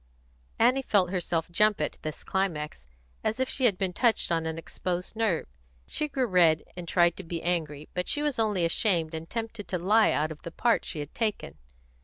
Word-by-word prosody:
Annie 250 +4 +4
felt 195 -8 +2
herself 170 -3 -1
jump 210 +3 +4
at 150 - -2
this 155 -1 -5
climax, 150 - -2 0.4
as 220 +3 -1
if 260 - +1
she 260 - 0
had 205 -6 +4
been 190 -2 -1
touched 235 -5 +2
on 165 -1 +1
an 160 0 -3
exposed 180 +3 -4
nerve. 220 -7 +1 0.4
She 300 - -2
grew 270 -3 0
red, 175 -6 +4
and 175 -1 -7
tried 175 -1 +3
to 195 - -7
be 165 -1 -5
angry, 155 -4 -2
but 180 0 -2
she 295 - +1
was 295 -5 -1
only 205 -6 +2
ashamed 165 -2 +1
and 160 +1 -6
tempted 225 -2 -5
to 185 - -1
lie 210 +5 +4
out 155 +1 0
of 155 - -9
the - - -6
part 235 +7 +1
she 155 - -3
had 145 - -8
taken. 210 - -3
180 Hz, 205 wpm, -28 LUFS, 165-220 Hz, 0.4 s, Annie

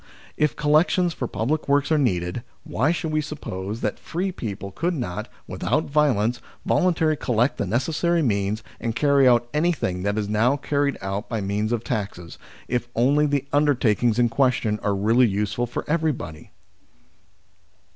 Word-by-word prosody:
If 150 -2 +1
collections 165 +4 +2
for 125 - -3
public 150 +9 -2
works 140 +2 +2
are 155 - +4
needed, 90 -5 0 0.2
why 135 +7 0
should 165 -2 -2
we 155 0 +1
suppose 110 -8 -6
that 105 - -2
free 185 +3 -3
people 100 - -6
could 170 - -1
not, 90 - -4 0.2
without 155 - -1
violence, 125 -6 +2 0.3
volun 180 -1 +3
tarily 155 -2 +1
collect 120 +2 +1
the - - -2
necessary 160 - +1
means 105 -2 0 0.2
and 115 -1 -3
carry 140 -2 +4
out 120 -1 +4
anything 150 - 0
that 100 +2 -1
is 105 -1 -1
now 115 +6 +2
carried 145 0 0
out 95 +2 -3
by 115 - -2
means 105 +2 -1
of 120 -2 -1
taxes, 95 -7 -4 0.3
if 120 -1 -1
only 145 +6 +3
the 140 -1 0
undertakings 120 -6 +2
in 120 -1 +4
question 115 -4 +1
are 100 -1 0
really 115 +5 +4
useful 105 +4 -1
for 120 - -5
everybody 150 - -2
125 Hz, 160 wpm, -23 LUFS, 105-150 Hz, 0.3 s, are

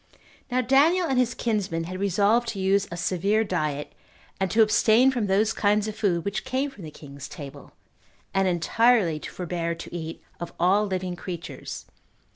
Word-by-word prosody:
2. 245 - -4
Now 255 - +4
Daniel 290 +9 +4
and 265 -5 +1
his 240 -2 +1
kinsmen 195 -8 -1
had 185 +3 -6
resolved 205 +5 +2
to 215 -3 -4
use 195 +1 +2
a 170 - -5
severe 195 +4 +1
diet, 155 -7 -2 0.5
and 190 -1 0
to 220 +3 +5
abstain 220 +4 +4
from 240 -5 -1
those 210 +3 +2
kinds 210 0 +1
of 215 - -5
food 175 -7 0
which 200 0 -2
came 265 +2 -1
from 205 -9 -13
the 155 - -7
king's 140 -2 -10
table, 140 -3 -10 0.6
and 195 0 +2
entirely 185 0 +2
to - - -7
forbear 170 -1 -3
to 165 - -10
eat 165 -1 -6 0.2
of 170 - -6
all 200 +4 +3
living 185 -2 -3
creatures. 175 -1 -7
195 Hz, 180 wpm, -25 LUFS, 170-225 Hz, 0.6 s, to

